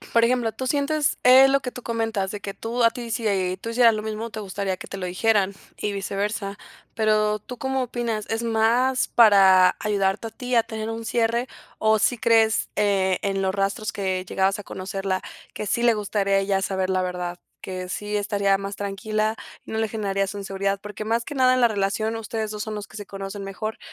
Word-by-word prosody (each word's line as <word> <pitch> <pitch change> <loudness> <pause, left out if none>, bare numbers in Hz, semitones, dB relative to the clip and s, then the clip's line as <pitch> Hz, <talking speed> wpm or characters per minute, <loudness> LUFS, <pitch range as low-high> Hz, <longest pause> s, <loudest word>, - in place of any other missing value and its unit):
Por 230 0 +6
ejemplo, 235 -2 +1
tú 260 - -5
sientes, 290 +2 +1
eh, 260 +2 +8
lo 275 0 +3
que 255 - -4
tú 250 - -9
comentas 225 -4 -1
de 205 - -6
que 200 0 -6
tú 235 +2 -2
a 230 - +6
ti 235 0 -7
si, 225 +1 -2
eh, 185 -2 0
tú 230 - -5
hicieras 230 -1 +5
lo 215 - -3
mismo, 220 +1 -4
te 220 - -6
gustaría 195 -1 -3
que - - -9
te - - -7
lo 190 - -5
dijeran, 200 +1 +2 0.2
y 205 - -2
viceversa. 200 +1 -3 0.4
Pero, 215 -1 +2
¿tú 250 +4 -9
cómo 265 +1 -1
opinas? 235 -3 -2
¿Es 225 +1 -1
más 235 +3 +2
para 195 -5 +6
ayudarte 205 +1 0
a - - -12
ti 250 0 -4
a 230 - +5
tener 220 0 -5
un 225 0 -5
cierre, 235 +1 +1 0.3
o 220 0 +3
sí 245 - +2
crees, 225 -1 +3
eh, 195 -3 +2
en 195 -1 -1
los 190 0 0
rastros 200 +2 -1
que 185 -2 -2
llegabas 190 +2 0
a 205 - -8
conocerla, 190 0 -3 0.3
que 210 - -5
sí 235 +4 0
le 240 -1 +5
gustaría 200 -1 0
a - - +5
ella 195 0 0
saber 190 -1 -1
la 185 0 +1
verdad, 180 -1 -4 0.2
que 185 -1 -6
sí 210 +3 -3
estaría 200 -1 +1
más 195 +1 -6
tranquila, 215 +2 -1 0.3
no 220 - -4
le 220 0 0
generarías 195 -2 -1
inseguridad? 195 0 -2
Porque 210 +1 -7
más 230 +2 0
que 295 - -7
nada 255 -1 +4
en 255 - +1
la 240 - +6
relación 215 +2 -1
ustedes 220 -1 -4
2 210 0 -4
son 215 -1 -4
los 205 -1 -6
que - - -13
se 205 - -6
conocen 195 +1 -7
mejor, 205 +3 -5
210 Hz, 215 wpm, -24 LUFS, 195-230 Hz, 0.4 s, eh